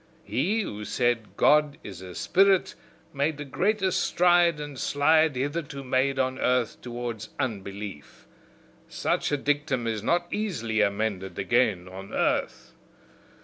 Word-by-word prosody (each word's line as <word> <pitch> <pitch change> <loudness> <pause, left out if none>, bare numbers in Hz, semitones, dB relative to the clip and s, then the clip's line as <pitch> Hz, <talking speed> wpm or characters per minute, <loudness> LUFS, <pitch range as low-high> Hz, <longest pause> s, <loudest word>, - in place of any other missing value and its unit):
He 160 - 0
who 105 - -5
said 120 0 -1
'God 150 -1 +4
is 95 -3 -9
a 90 -2 -9
Spirit' 195 - +3 0.4
made 145 +2 0
the 145 - -6
greatest 190 +6 +1
stride 175 -2 +3
and 145 -3 -7
slide 155 +1 +3
hitherto 140 +1 -3
made 130 +1 +1
on 130 0 0
earth 125 -2 0
towards 120 -3 -5
unbelief: 100 - -5 0.6
such - - -1
a 145 - +2
dictum 145 -3 -1
is 110 -2 -2
not 175 +9 +1
easily 115 - -1
amended 100 -3 -1
again 110 -7 +1
on 95 +1 -9
earth! - - -1
130 Hz, 130 wpm, -26 LUFS, 110-150 Hz, 0.6 s, God